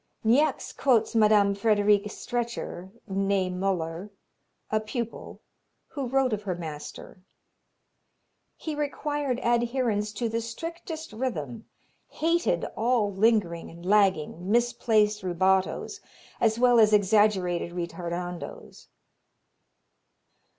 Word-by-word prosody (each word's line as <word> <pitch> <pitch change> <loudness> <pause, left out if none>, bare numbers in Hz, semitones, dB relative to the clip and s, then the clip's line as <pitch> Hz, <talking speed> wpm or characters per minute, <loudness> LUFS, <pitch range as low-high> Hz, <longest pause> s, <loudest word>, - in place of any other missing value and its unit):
Niecks 250 +8 +2
quotes 250 -5 +2
Mme. 210 -3 +4
Friederike 205 0 +2
Stretcher, 235 -6 -4 0.2
nee 195 -1 0
Muller, 180 0 -2 0.6
a 215 - +2
pupil, 230 +1 -6 0.5
who 275 -4 -4
wrote 260 -1 +1
of 210 - -2
her 190 -4 -3
master: 160 +2 -8 1.3
"He 315 - -5
required 290 -3 -2
adherence 235 -3 +1
to 235 +1 -2
the 225 +1 -2
strictest 320 +5 -7
rhythm, 210 - -4 0.4
hated 340 +9 0
all 225 -3 +1
lingering 195 -5 +1
and 170 +1 -12
lagging, 190 -3 +2
misplaced 225 -3 +2
rubatos, 190 +1 0 0.4
as 220 -1 +2
well 245 -1 +5
as 215 -1 +5
exaggerated 195 -4 +2
ritardandos. 175 0 -6
210 Hz, 95 wpm, -27 LUFS, 185-240 Hz, 1.3 s, well